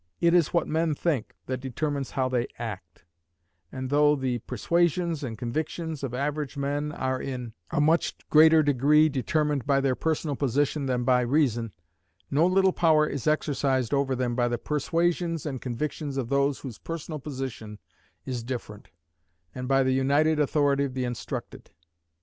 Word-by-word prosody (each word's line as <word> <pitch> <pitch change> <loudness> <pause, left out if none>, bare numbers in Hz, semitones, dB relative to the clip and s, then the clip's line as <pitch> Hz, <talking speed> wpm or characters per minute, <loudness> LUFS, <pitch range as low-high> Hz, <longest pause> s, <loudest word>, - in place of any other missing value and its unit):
It 170 0 +3
is 175 -4 +4
what 170 - +1
men 160 -1 0
think 145 -7 -1
that 130 -1 -3
determines 135 +2 -3
how 130 -1 0
they 125 -2 0
act; 95 -8 -7 0.7
and 130 0 -5
though 150 0 +4
the 130 -3 -1
persuasions 170 - 0
and 115 -4 -5
convictions 155 +5 -4
of 135 - -2
average 145 +1 -2
men 145 +2 -2
are 130 -3 -2
in 125 -4 -5 0.2
a 170 - -1
much 160 +3 +2 0.2
greater 160 +1 +7
degree 145 +3 +4
determined 145 0 -1
by 140 -1 +3
their 135 -1 +1
personal 155 +1 -1
position 140 +2 0
than 125 -1 0
by 125 0 +3
reason, 120 -4 +1 0.6
no 155 +5 +4
little 190 0 +3
power 155 -3 +4
is 140 -1 -4
exercised 135 -5 +1
over 140 -1 +1
them 125 -1 -1
by 120 -1 +2
the 120 0 -1
persuasions 165 +4 -1
and 135 -4 -4
convictions 140 +3 -4
of 125 -4 -2
those 140 0 +1
whose 125 -6 -8
personal 165 -1 -6
position 130 -6 -6 0.5
is 125 -2 -3
different, 115 -4 -6 0.7
and 125 0 -5
by 135 0 +3
the 130 0 +2
united 145 +4 +2
authority 145 -1 +2
of 135 -2 -4
the 130 - -1
instructed. 120 -1 -6
140 Hz, 160 wpm, -27 LUFS, 130-155 Hz, 0.7 s, greater